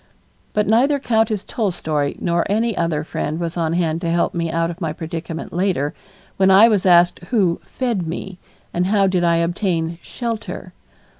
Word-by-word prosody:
But 210 0 +2
neither 250 +7 +3
Countess 220 -5 +1
Tolstoy 160 - -1
nor 170 -1 0
any 225 +2 +1
other 160 -4 0
friend 155 0 -3
was 170 -1 -3
on 165 -2 0
hand 165 -1 0
to 170 - -1
help 170 +1 +1
me 170 -1 -1
out 165 +1 0
of 170 +3 -11
my 160 -3 -1
predicament 165 +1 -6
later, 175 -6 0 0.4
when 190 0 +4
I 195 +4 +8
was 200 -4 +2
asked 175 0 +5
who 190 -8 +1
"fed" 230 -10 -2
me, 180 +2 -6 0.3
and 180 +1 +1
how 200 0 +3
did 185 -2 +1
I 170 -1 +3
obtain 170 -1 -1
"shelter"? 230 -2 -5
175 Hz, 170 wpm, -20 LUFS, 165-210 Hz, 0.4 s, I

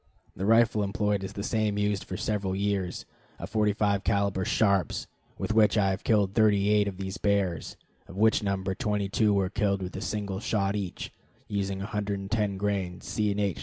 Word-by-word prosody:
The 95 - -2
rifle 115 -1 +4
employed 100 0 0
is 95 - -6
the 100 - -5
same 110 -1 0
used 105 -1 0
for 95 - -5
several 100 -3 -1
years, 100 -2 -1 0.3
a - - -6
45 105 -2 +1
caliber 100 -1 +1
Sharps, 100 -2 +1 0.3
with - - -2
which 110 0 +4
I 100 -2 +3
have 95 +3 -4
killed 100 -4 +2
thirty 105 -2 +3
eight 105 -1 +3
of 95 -2 -4
these 95 +1 -5
bears, 100 -5 0 0.3
of 90 - -11
which 110 +1 +4
number 95 -2 -1
twenty 105 0 -1
two 105 +1 +2
were 100 -2 +1
killed 100 -2 0
with 90 - -6
a 95 - -4
single 100 -3 -3
shot 100 -2 0
each, 100 -4 -5 0.3
using 100 -1 -2
110 100 0 -2
grains 95 -3 -2
C. 105 +2 0
& 100 - -3
H. 100 -3 -1
100 Hz, 185 wpm, -28 LUFS, 95-105 Hz, 0.3 s, rifle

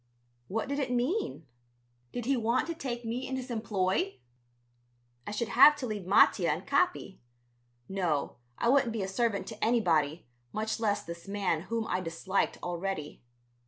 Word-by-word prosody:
What 220 +3 -2
did 280 +1 -2
it 265 -3 -1
mean? 250 - -1 0.7
Did 245 - -4
he 275 +2 +2
want 235 +1 +1
to 335 - -3
take 245 -6 -5
me 240 +3 -3
in 265 - -3
his 260 -1 -5
employ? 195 -4 0 1.1
I - - -3
should 210 +2 -2
have 285 +5 +8
to 285 - -5
leave 210 -6 -4
Mattia 190 -2 +5
and 160 +5 -1
Capi. 285 - 0 0.7
No, 175 -7 -1 0.2
I - - 0
wouldn't 255 -2 +4
be 215 -4 -2
a - - -2
servant 210 +1 0
to 220 -2 -6
anybody, 170 -9 +2 0.3
much 220 +1 -2
less 210 -3 0
this 170 +2 -9
man 195 -5 0
whom 230 -1 -1
I 185 - -1
disliked 185 +3 -1
already. 175 -3 -4
220 Hz, 160 wpm, -30 LUFS, 185-245 Hz, 1.1 s, have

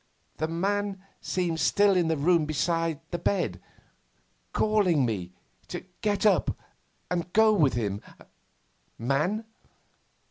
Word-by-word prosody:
The 155 - -1
man 195 +3 -1 0.2
seemed 175 -3 -1
still 200 +2 +4
in 175 -3 +2
the 160 -1 +1
room 165 +2 +3
beside 165 +1 0
the 175 - -2
bed, 195 -3 -1 0.9
calling 195 -10 +2
me 95 -6 -3 0.4
to - - -6 0.2
get 210 -1 0
up 210 - +3 0.5
and 175 0 -2
go 220 0 +6
with 150 -11 +3
him 105 -3 -2 0.5
' - - -42
'Man! 150 - 0
175 Hz, 120 wpm, -27 LUFS, 150-200 Hz, 0.9 s, go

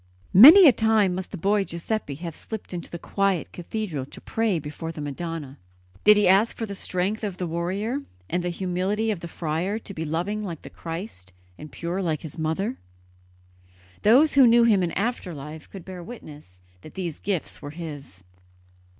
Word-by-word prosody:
Many 310 - +11
a - - +9
time 220 -5 +2
must 185 0 -4
the - - -7
boy 200 +3 +2
Giuseppe 170 -3 -4
have 165 +1 -7
slipped 220 -4 -7
into 175 -1 -5
the 170 - -6
quiet 195 0 -1
cathedral 175 -7 -4
to - - -11
pray 225 -5 0
before 155 +2 -6
the 160 - -10
Madonna. 145 -1 -5 0.4
Did 210 0 +7
he 210 - +4
ask 195 +5 +4
for 225 - -2
the 200 - -6
strength 195 +3 -2
of 200 -4 -3
the 180 - -3
warrior 185 - -2 0.3
and 175 - -1
the 175 - -1
humility 190 +5 -1
of 200 - -3
the 170 - -7
friar, 165 +5 -2
to 215 -2 -9
be 160 - -4
loving 175 +7 -2
like 175 -7 -6
the - - -10
Christ 165 - -7 0.2
and 150 +9 -11
pure 175 +3 -3
like 160 -5 -2
His 160 +1 -8
Mother? 175 +10 -2 1.2
Those 265 +9 +5
who 270 -3 +7
knew 235 0 +6
him 215 -5 +4
in 175 -2 -1
after 200 -5 -2
life 150 +2 -9
could 190 -4 -10
bear 185 -2 -8
witness 150 - -12 0.2
that 155 - -13
these 175 -5 -4
gifts 190 -5 -2
were 145 - -7
his. 145 - -8
180 Hz, 185 wpm, -25 LUFS, 160-210 Hz, 1.2 s, Many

